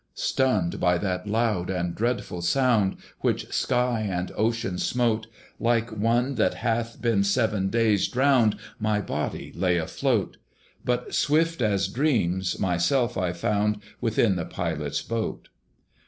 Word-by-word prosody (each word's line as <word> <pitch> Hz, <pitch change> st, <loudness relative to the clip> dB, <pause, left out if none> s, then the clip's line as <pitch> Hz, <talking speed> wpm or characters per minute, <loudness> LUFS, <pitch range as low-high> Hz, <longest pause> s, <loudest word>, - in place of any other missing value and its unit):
Stunned 110 Hz, -10 st, +1 dB
by 90 Hz, 0 st, +3 dB
that 90 Hz, +1 st, -2 dB
loud 105 Hz, -4 st, 0 dB
and 90 Hz, -2 st, -1 dB
dreadful 115 Hz, -5 st, -2 dB
sound, 110 Hz, 0 st, +2 dB, 0.2 s
Which -, -, -1 dB
sky 125 Hz, -2 st, +1 dB
and 95 Hz, -4 st, -2 dB
ocean 110 Hz, -4 st, -1 dB
smote, 115 Hz, -3 st, 0 dB, 0.3 s
Like 115 Hz, 0 st, +1 dB
one 115 Hz, +5 st, +1 dB
that -, -, +2 dB
hath 115 Hz, 0 st, -2 dB
been 115 Hz, -4 st, +2 dB
seven 100 Hz, -2 st, +1 dB
days 110 Hz, -2 st, +2 dB
drowned 125 Hz, -4 st, +3 dB, 0.2 s
My 110 Hz, -1 st, +1 dB
body 105 Hz, -, -4 dB
lay 90 Hz, 0 st, +2 dB
afloat; 80 Hz, -1 st, -1 dB, 0.5 s
But 125 Hz, 0 st, -1 dB
swift 160 Hz, 0 st, +2 dB
as 100 Hz, -4 st, +2 dB
dreams, 95 Hz, -, 0 dB
myself 115 Hz, +7 st, +1 dB
I 90 Hz, -2 st, 0 dB
found 105 Hz, +4 st, 0 dB, 0.2 s
Within 110 Hz, -4 st, +2 dB
the 85 Hz, -, -2 dB
Pilot's 80 Hz, -5 st, -3 dB
boat. 115 Hz, -1 st, -4 dB
110 Hz, 130 wpm, -26 LUFS, 95-120 Hz, 0.5 s, by